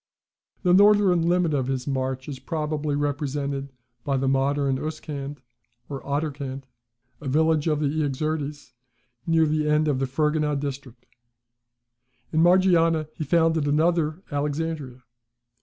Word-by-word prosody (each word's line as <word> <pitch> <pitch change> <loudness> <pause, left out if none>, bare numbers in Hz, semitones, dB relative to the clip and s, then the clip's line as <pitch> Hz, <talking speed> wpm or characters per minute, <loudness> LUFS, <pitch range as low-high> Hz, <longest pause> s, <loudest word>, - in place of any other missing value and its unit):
The 180 -2 +4
northern 195 -4 +5
limit 175 -3 +2
of 135 -3 0
his 130 -1 -2
march 130 -1 -2
is 140 -3 -6
probably 150 +1 -2
represented 140 -1 -2 0.3
by 140 -1 0
the 135 +1 0
modern 135 0 +1
Uskand, 145 -2 -5 0.5
or 140 -2 -5
Aderkand, 140 -2 -3 0.6
a 145 - -6
village 155 +2 +2
on 155 -2 +2
the - - +1
Iaxartes, 150 0 -2 0.6
near 165 -1 +4
the 150 0 0
end 150 +1 +3
of 140 -3 +1
the 135 - 0
Ferganah 150 +1 0
district. 135 -3 -7 1.3
In 160 - +2
Margiana 165 -3 +4
he - - -4
founded 160 0 +2
another 160 +2 +1
Alexandria. 145 -3 -3
150 Hz, 125 wpm, -25 LUFS, 140-160 Hz, 1.3 s, northern